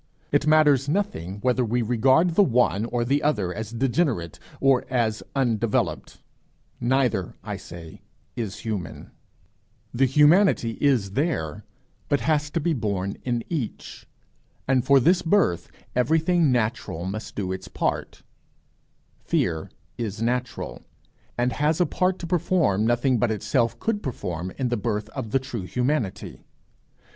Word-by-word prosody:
It - - +2
matters 145 -3 +4
nothing 145 - -2
whether 125 0 +2
we 120 +1 0
regard 130 +9 +3
the 170 - +4
one 120 - +2
or 120 0 -1
the 140 +4 +1
other 105 -12 0
as 110 +1 -5
degenerate 120 - -1 0.2
or 135 -2 +3
as 115 -4 0
undeveloped 115 -5 -1 0.6
neither 120 -7 0
I - - -4
say 85 -2 -11 0.3
is 110 -5 -4
human; 100 -9 -5 0.8
the 135 +2 +3
humanity 150 - +4
is 125 -9 +2
there, 125 - -2 0.4
but 145 - +2
has 150 -1 +1
to 165 - -1
be 165 +1 0
born 100 -6 -2
in 120 -2 -1
each, 145 -10 -5 0.6
and 130 -2 +3
for 140 +1 +5
this 175 +8 +3
birth 165 - +1 0.3
everything 160 +4 +3
natural 110 -8 -1
must 100 +3 -5
do 95 -3 -2
its 95 - -5
part; - - -3 1.0
fear 80 -1 -1 0.3
is 110 -3 -3
natural, 125 +2 -2 0.6
and 125 +1 +1
has 150 +3 +1
a 180 - +4
part 185 +1 0
to - - -7
perform 165 - +1
nothing 120 +1 +2
but 120 - +2
itself 110 +2 0
could 220 -2 -1
perform 95 - -4
in 130 -2 -1
the 120 - 0
birth 105 -1 -2
of 120 -2 -6
the 120 - +2
true 125 -8 -5
humanity. 125 -6 -2
125 Hz, 140 wpm, -24 LUFS, 105-145 Hz, 1.0 s, for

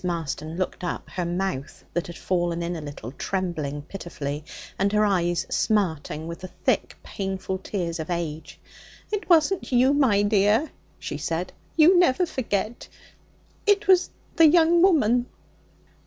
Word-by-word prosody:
Marston 165 -2 -3
looked 185 -1 -3
up; 175 - -4
her 180 -2 -2
mouth, 175 -5 -3
that 175 - -2
had 175 - -9
fallen 175 -2 -1
in 175 +1 -3
a 160 - -5
little, 145 -5 -8
trembling 155 -4 -3
pitifully, 150 -4 -6 0.4
and 200 +1 +2
her 210 0 +3
eyes 175 -4 +1
smarting 160 -7 0
with 170 0 -6
the 185 - -7
thick, - - -1
painful 190 -1 -4
tears 175 -4 -3
of 160 - -5
age. 160 -3 -4 0.5
'It 420 -2 -3
wasn't 340 +1 +3
you, 255 +2 +4
my 245 -9 +3
dear,' 210 +7 +3 0.3
she 145 - -5
said; 165 +4 -3 0.2
'you 345 +3 +7
never 355 +1 +3
forget; 230 - -3 0.8
it 410 0 +3
was 370 -2 +5 0.3
the 330 -2 +8
young 335 +1 +5
woman.' 250 - +4
190 Hz, 145 wpm, -25 LUFS, 170-250 Hz, 0.8 s, the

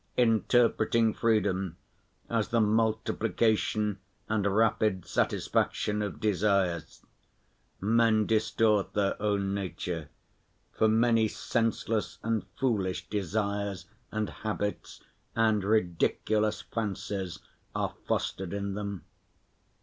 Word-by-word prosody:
Interpreting 115 -1 +3
freedom 95 -6 +1 0.5
as 115 -2 0
the 115 - +1
multiplication 110 -1 +1 0.3
and 105 -2 +1
rapid 105 -2 +2
satisfaction 105 0 0
of 105 0 -4
desires, 100 -5 0 0.8
men 110 +1 +3
distort 110 -1 +2
their 100 -2 +1
own 100 -2 0
nature, 90 -5 -4 0.6
for 110 - +3
many 115 0 +4
senseless 115 -1 -1
and 115 -1 0 0.2
foolish 100 -8 0
desires 100 0 -2 0.3
and 110 -1 -2
habits 105 -1 -4 0.3
and 110 -3 +3
ridiculous 105 +2 +1
fancies 100 -4 -3 0.4
are - - -1
fostered 95 -1 -1
in 100 0 -2
them. 100 -2 -5
105 Hz, 90 wpm, -29 LUFS, 100-110 Hz, 0.8 s, many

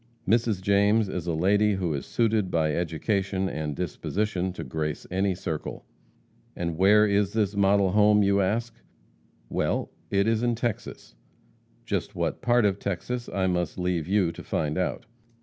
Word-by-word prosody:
Mrs. 110 -3 +2
James 100 +2 +3
is 90 -2 -4
a 85 - 0
lady 100 +5 +3
who 90 -4 -1
is 70 - -4
suited 110 -4 +1
by 80 -3 +1
education 95 +4 -1
and 75 -5 -3
disposition 95 +2 -2
to - - -6
grace 75 +3 -4
any 95 0 +1
circle. 80 -4 -5 0.7
And 85 -2 -3
where 105 +5 +5
is 100 -1 +1
this 105 -2 0
model 100 -1 +3
home? 105 +1 +5
you 100 0 +3
ask. 115 +5 -1 0.7
Well, - - -1 0.2
it 100 +1 +2
is 115 -1 +2
in 120 -1 +1
Texas 115 - -4 0.7
just - - -3
what - - -2
part 120 -2 +3
of 100 -1 +1
Texas 120 +6 -3
I 95 -1 -1
must 90 -3 -1
leave 90 -3 -1
you 95 -3 +2
to - - -10
find 75 -1 -2
out. 95 +6 -2
100 Hz, 160 wpm, -26 LUFS, 90-105 Hz, 0.7 s, where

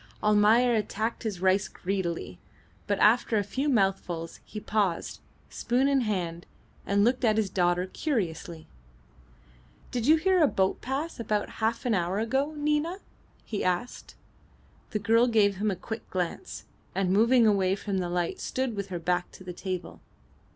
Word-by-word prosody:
Almayer 215 +4 +4
attacked 220 +1 -2
his 210 -6 -4
rice 190 +1 +3
greedily, 175 - -4 0.5
but 200 - +1
after 220 +1 +4
a 205 - +2
few 265 +9 -2
mouthfuls 190 - 0
he 215 - -8
paused, 205 -5 -1 0.3
spoon 250 +3 0
in 275 -1 +3
hand, 175 -6 -3 0.4
and 200 0 +3
looked 245 +3 +2
at 220 -2 +3
his 210 -4 0
daughter 180 -1 +1
curiously. 180 - -3 1.3
"Did 245 0 -2
you 310 - +7
hear 370 +2 +3
a 305 - +6
boat 190 -6 0
pass 275 +4 -3
about 210 -2 -1
half 225 +2 0
an 240 - +2
hour 180 0 0
ago 265 +7 0
Nina?" 300 +4 0 0.5
he 210 - -3
asked. 180 +6 -2 0.7
The 215 - -2
girl 225 +4 +3
gave 205 -4 +3
him 210 +2 0
a 195 - -1
quick 220 +5 -7
glance, 185 - -4 0.3
and 190 -1 +1
moving 235 +3 +5
away 195 -3 +3
from 200 -1 -3
the 175 -1 -2
light 175 -1 -2
stood 260 -3 -2
with 200 -1 -4
her 185 -2 -4
back 175 +1 -1
to - - -12
the 180 -1 -7
table. 185 -1 -5
205 Hz, 160 wpm, -28 LUFS, 185-240 Hz, 1.3 s, you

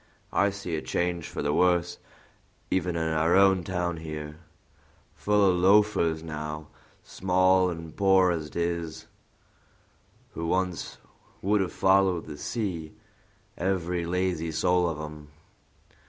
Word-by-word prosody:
I 100 - +3
see 95 -4 -5
a 75 - -3
change 85 0 -2
for - - -5
the 75 0 0
worse 90 0 +2 0.7
even 90 -2 0
in 80 -1 -1
our 80 +2 +2
own 95 -2 +5
town 90 -2 -2
here; 75 -1 -7 0.7
full 105 -1 +2
of 90 -1 +3
loafers 95 -4 +3
now, 75 -1 -6 0.3
small 95 0 +2
and 80 -2 -7
poor 95 -2 +4
as 80 -3 -3
'tis, 85 -1 -3 1.3
who 85 - -4
once 90 0 -2 0.5
would 105 +1 +2
have 95 - -2
followed 95 -2 +2
the 75 -2 -9
sea, 90 -9 -4 0.6
every 90 -2 -1
lazy 90 -2 -1
soul 90 +2 +2
of 80 -2 -5
'em. 75 -1 -8
85 Hz, 125 wpm, -27 LUFS, 80-95 Hz, 1.3 s, own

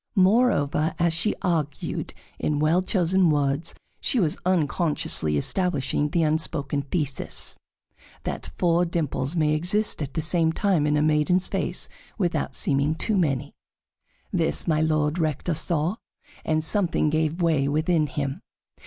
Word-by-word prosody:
Moreover, 185 - +3
as 170 -1 +2
she 170 +6 +1
argued 155 -6 -2 0.2
in 150 - 0
well 155 +4 +3
chosen 185 -1 +2
words, 145 +2 0 0.2
she 255 - +1
was 160 -7 +1
unconsciously 150 - +1
establishing 150 - 0
the 165 +2 +1
unspoken 150 -2 0
thesis: 145 -1 -4 0.6
That - - -4
four 170 0 +3
dimples 160 -3 -2
may 155 -2 +2
exist 180 +6 0
at 140 -2 -5
the 160 - 0
same 160 0 +1
time 180 -6 +1
in 150 0 +2
a 150 - +2
maiden's 155 +4 +2
face - - -2 0.3
without 180 -5 -1
seeming 140 +2 +1
too 215 +6 -1
many. 145 -6 0 0.8
This - - +1
My 155 -2 +2
Lord 155 +1 +1
Rector 155 +2 -1
saw, 165 +4 +1 0.5
and 155 0 0
something 165 -3 +1
gave 155 +2 0
way 155 -5 +2
within 155 +2 +1
him. 140 -2 -4
155 Hz, 135 wpm, -25 LUFS, 150-175 Hz, 0.8 s, Moreover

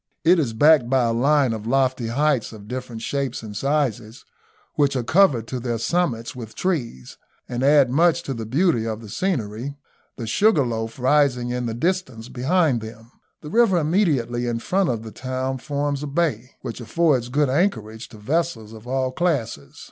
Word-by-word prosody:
It 170 +2 +5
is 130 -8 -1
backed 145 0 +5
by 130 -1 +3
a 115 -1 +1
line 135 +1 +2
of 110 0 -6
lofty 130 -2 +1
heights 140 0 +1
of 105 -1 -12
different 125 -2 -6
shapes 140 -4 -3
and 105 -2 -8
sizes, 125 -3 -2 0.5
which 140 -2 +1
are 125 - 0
covered 145 - +3
to 130 - -3
their 120 -1 -2
summits 120 -4 -1
with 115 -3 -9
trees, 120 - -3 0.3
and 120 0 -4
add 140 -2 +5
much 165 +4 +3
to 135 - -4
the 115 -3 -6
beauty 130 -3 +1
of 110 0 -4
the 110 - -11
scenery, 130 - -3 0.4
the 115 - -5
Sugarloaf 115 - +1
rising 130 -2 +2
in 125 -1 -2
the 115 - -3
distance 130 -6 -2
behind 135 -1 +1
them. 110 +1 -11 0.3
The 150 - -9
river 225 -5 +4
immediately 150 - +1
in 120 -1 -1
front 185 +11 0
of 115 -3 -2
the 110 - -8
town 130 +1 -3
forms 145 +1 -2
a 150 - -4
bay, 140 -6 -1
which 120 -1 -6
affords 130 -1 +1
good 145 +3 +2
anchorage 120 - -1
to 110 - -13
vessels 115 -2 -2
of 110 +1 -12
all 130 0 -1
classes. 125 - -2
130 Hz, 180 wpm, -22 LUFS, 115-150 Hz, 0.5 s, It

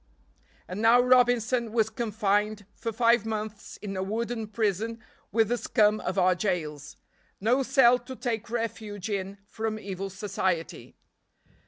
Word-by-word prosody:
And 185 +4 -5
now 230 +2 +6
Robinson 245 -2 +3
was 220 -1 +1
confined 210 -2 0
for 230 -1 -4
five 230 0 +3
months 215 -1 -5
in 195 -1 -4
a 185 - -2
wooden 225 +3 -3
prison 220 +1 -1 0.3
with 225 -1 +2
the 240 0 0
scum 215 -2 +3
of 185 - -3
our 185 -1 +4
jails. 160 -7 -3 0.4
No 240 +7 +2
cell 255 -2 +5
to 255 +2 -9
take 230 -3 -3
refuge 220 -3 -4
in 195 0 -3
from 220 +1 -3
evil 195 -2 -5
society. 190 -3 -3
215 Hz, 140 wpm, -27 LUFS, 200-235 Hz, 0.4 s, now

